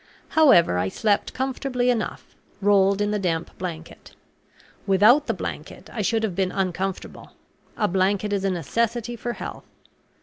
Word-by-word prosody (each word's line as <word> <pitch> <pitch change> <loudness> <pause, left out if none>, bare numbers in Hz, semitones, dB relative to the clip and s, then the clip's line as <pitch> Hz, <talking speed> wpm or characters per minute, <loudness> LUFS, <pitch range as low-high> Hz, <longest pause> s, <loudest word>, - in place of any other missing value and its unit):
However, 220 - +5
I 90 +1 0
slept 205 - 0
comfortably 255 -1 -1
enough, 230 -3 -4 0.2
rolled 200 0 +3
in 205 0 0
the 210 - 0
damp 170 -3 -2
blanket. 165 -3 -7 0.7
Without 215 +10 +5
the - - +1
blanket - - -7
I 225 - -2
should 225 +2 0
have 200 -5 -2
been 185 -1 0
uncomfortable; 190 0 -4 0.4
a 210 - +2
blanket 195 +2 0
is 195 -1 -1
a 195 - +1
necessity 230 +6 -1
for 240 +1 -4
health. - - -8
205 Hz, 145 wpm, -24 LUFS, 185-235 Hz, 0.7 s, However